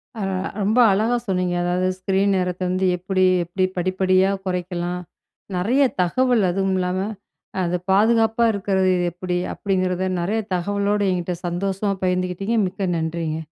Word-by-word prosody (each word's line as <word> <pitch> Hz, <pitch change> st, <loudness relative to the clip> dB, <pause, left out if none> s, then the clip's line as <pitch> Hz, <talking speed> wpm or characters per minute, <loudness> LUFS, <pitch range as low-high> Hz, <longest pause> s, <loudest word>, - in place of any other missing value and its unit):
ஆ. 220 Hz, -, -5 dB, 0.4 s
ரொம்ப 215 Hz, +4 st, +1 dB
அழகா 220 Hz, +5 st, +2 dB
சொன்னிீங்க. 180 Hz, -2 st, 0 dB
அதாவது 180 Hz, +1 st, 0 dB
ஸ்க்ரீன் 195 Hz, +1 st, +1 dB
நேரத்த 180 Hz, 0 st, -2 dB
வந்து 185 Hz, +1 st, 0 dB
எப்பிடி 185 Hz, +1 st, +1 dB, 0.2 s
எப்பிடி 180 Hz, +2 st, 0 dB
படிப்படியா 185 Hz, +1 st, +2 dB, 0.2 s
குறைக்கலாம் 180 Hz, -1 st, -3 dB, 0.6 s
நிறைய 235 Hz, +10 st, +2 dB, 0.2 s
தகவல் 240 Hz, +5 st, +2 dB
அதுவும் 195 Hz, +1 st, 0 dB
இல்லாமல 185 Hz, +2 st, -1 dB, 0.6 s
அது 175 Hz, 0 st, 0 dB, 0.2 s
பாதுகாப்பா 225 Hz, +3 st, +3 dB
இருக்கிறது 190 Hz, -2 st, +1 dB, 0.2 s
எப்பிடி? 180 Hz, +1 st, -3 dB, 0.2 s
அப்படிங்கிறத 185 Hz, -1 st, -1 dB
நிறைய 205 Hz, +6 st, 0 dB, 0.2 s
தகவலோட 200 Hz, +3 st, 0 dB
என்கிட்ட 180 Hz, -1 st, -2 dB
சந்தோஷமா 195 Hz, +3 st, -1 dB
பகிர்ந்துக்கிட்டீங்க. 185 Hz, +4 st, 0 dB
மிக்க 190 Hz, 0 st, -3 dB
நன்றிங்க. 160 Hz, -1 st, -3 dB
185 Hz, 125 wpm, -22 LUFS, 180-200 Hz, 0.6 s, பாதுகாப்பா